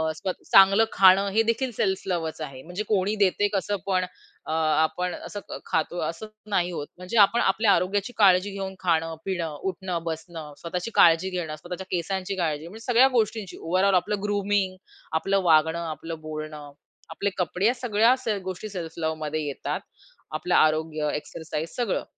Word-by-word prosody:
स्वतः 185 +2 -5
चांगलं 195 +3 +7
खाणं 195 +1 +6
हे 220 - +4
देखील 230 +3 0
सेल्फ 190 -3 0
लव्हच 165 -3 -2
आहे. 135 -4 -7
म्हणजे 180 +5 -5
कोणी 205 0 +1
देते 205 0 +2
कसं 200 +1 0
पण 185 -1 +1 0.4
अ, - - -5
आपण 160 +3 +1
असं 205 - -7
ख - - -5
खातो 160 +2 -1
असं 170 +6 -7 0.2
नाही 180 -3 +1
होत. 150 -4 -5
म्हणजे 180 +5 -4
आपण 220 +4 +5
आपल्या 205 +2 +3
आरोग्याची 200 +6 0
काळजी 195 -1 +5
घेऊन 195 -1 -5
खाणं, 165 -2 0
पिणं, 170 -5 -2
उठणं, 180 -2 -4
बसणं, 160 -2 -6
स्वतःची 180 +6 -4
काळजी 170 +3 +5
घेणं, 175 -4 -4
स्वतःच्या 180 +3 -7
केसांची 190 +2 -2
काळजी 160 -2 -1
म्हणजे 220 +5 -11
सगळ्या 245 +2 +6
गोष्टींची 215 -3 -1
ओव्हरऑल 185 +3 +2
आपलं 195 +4 +1
ग्रूमिंग, 205 -2 0 0.4
आपलं 195 +4 +1
वागणं, 160 0 +4
आपलं 165 +1 -7
बोलणं, 155 -1 -7 0.4
आपले 200 - -2
कपडे 180 +1 -1
या 240 - +3
सगळ्या 235 0 +3
से 215 -2 0
गोष्टी 190 +4 -6
सेल्फ 170 -4 -6
लव्हमध्ये 155 -1 -2
येतात. 140 - -3 0.5
आपलं 175 +3 0
आरोग्य, 155 -1 +2
एक्सरसाइज 160 +1 -5
सगळं. 240 -5 0
180 Hz, 160 wpm, -25 LUFS, 160-200 Hz, 0.5 s, चांगलं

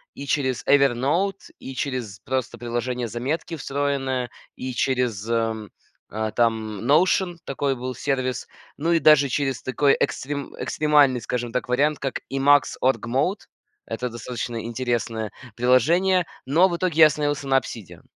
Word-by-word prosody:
и 140 - -7
через 130 -4 0
Evernote, 145 +8 +2
и 135 - -8
через 125 -7 -3
просто 130 -1 -3
приложение 120 +1 -3
"Заметки" 135 +9 -3
встроенное, 135 -3 -2 0.3
и 130 0 -4
через, 120 -4 0
ам, 110 -2 -1 0.7
там 110 -3 0
Notion, 175 +5 +3
такой 135 0 -1
был 130 +1 -5
сервис, 130 -1 -2 0.3
ну 165 +4 0
и 170 - +4
даже 145 -2 +6
через 135 -2 -1
такой 140 +2 +3
экстрим 140 0 -2
экстремальный, 145 -4 +3
скажем 120 0 -3
так, 125 - -2
вариант, 145 +4 +2
как 135 -1 -3
Emacs 140 +1 +3
Org-mode. 135 - 0 0.4
Это 125 +2 -3
достаточно 120 0 -5
интересное 115 -2 -2 0.2
приложение, 165 +10 +3 0.2
но 160 +8 +4
в 170 - -2
итоге 170 -3 -1
я 155 - +11
остановился 145 -1 -2
на 135 0 +4
Obsidian. 115 -7 -6
130 Hz, 135 wpm, -23 LUFS, 120-145 Hz, 0.7 s, я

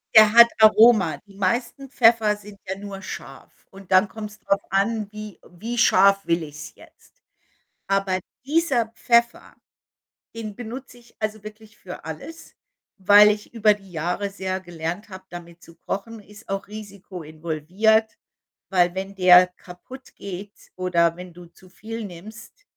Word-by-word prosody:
Der 215 -1 +8
hat 235 0 +9
Aroma. 215 -7 +6
Die 200 - -18
meisten 235 +8 -2
Pfeffer 225 -4 +4
sind 205 -1 -14
ja 190 +1 -4
nur 200 -1 -8
scharf 190 - -10 0.2
und 195 -1 -15
dann 185 +2 +5
kommt's 210 +1 -9
drauf 200 0 0
an, 210 +2 0
wie 215 -2 -9
wie 225 +7 -6
scharf 195 -3 +4
will 170 0 0
ich's 150 +1 -10
jetzt? - - -21 0.7
Aber 195 -1 0 0.3
dieser 280 -6 +1
Pfeffer, 235 -1 +1 0.8
den 220 -2 -7
benutze 245 +3 -9
ich 240 -1 -23
also 215 -1 -4
wirklich 215 0 -13
für 180 - -10
alles, 240 - -9 0.4
weil 205 +2 +7
ich 210 +2 -4
über 215 -2 +4
die 195 -2 -17
Jahre 180 +4 -3
sehr 190 -1 -4
gelernt 175 +2 -6
habe, 190 -1 -11
damit 170 -1 -11
zu 165 - -16
kochen. 220 +6 -6
Ist 210 +1 -17
auch 195 0 -4
Risiko 200 -4 -10
involviert, 170 +8 0 0.5
weil 175 -2 +2
wenn 195 +1 -5
der 180 -1 +7
kaputt 255 +9 -13
geht 200 +1 -8 0.2
oder 170 -2 +1
wenn 180 0 -10
du 175 +1 -13
zu 180 +2 -20
viel 225 +4 -8
nimmst 215 - -12
200 Hz, 150 wpm, -23 LUFS, 180-220 Hz, 0.8 s, hat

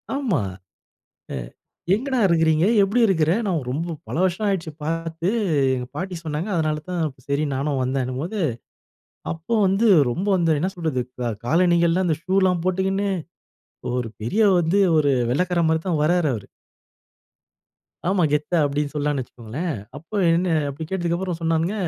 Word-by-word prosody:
ஆமா. 250 - 0 0.9
அ - - -4 0.6
எங்கடா! 260 +3 -1
இருக்கிறீங்க 160 -1 +3 0.2
எப்பிடி 205 +5 +2
இருக்கிற? 165 -5 +2
நான் 180 -4 +1
ரொம்ப 165 +6 -2 0.2
பல - - -4
வருஷம் 190 +3 0
ஆயிடுச்சு 185 -5 -1
பார்த்து 165 +1 -2 0.5
எங்க 125 -1 -4
பாட்டி 185 +3 -4
சொன்னாங்க. 160 +4 -3
அதனால 155 -2 0
தான் 175 -2 -1 0.3
சரி 140 +2 +1
நானும் 140 0 -1
வந்தேனும்போது, 130 - -2 0.9
அப்போ 165 +7 -4
வந்து 195 +5 +3 0.2
ரொம்ப 185 +12 -3
வந்து 165 -3 +2
என்ன 185 - +1
சொல்றது, 160 -7 -1 0.4
காலணிகள்லாம் 170 +4 +3
அந்த 160 -3 +1
ஷு 185 - -2
ல்லாம் 180 -2 +1
போட்டுக்கின்னு, 190 +2 0 0.9
ஒரு 125 -3 -2
பெரிய 205 - +2
வந்து 175 +4 +2 0.2
ஒரு 145 -2 +3 0.2
வெள்ளைக்கார 175 +4 +1
மாரி 160 0 +1
தான் 160 -4 +1
வர்றாரு 170 -1 +2
அவரு. 105 - -7 1.6
ஆமா. 190 -2 +2
கெத்தா 150 +4 +1
அப்டி 145 +1 0
சொல்லலானு 145 -2 0
வச்சுக்ககோங்களேன். 130 +7 -5 0.2
அப்ப 165 +8 -15 0.2
என்ன 170 0 +2
அப்டி 140 +3 -6
கேட்டதுக்கு 175 -3 -1
அப்புறம் 180 -2 -3
சொன்னாங்க. 165 +3 +1
165 Hz, 140 wpm, -23 LUFS, 150-185 Hz, 1.6 s, இருக்கிறீங்க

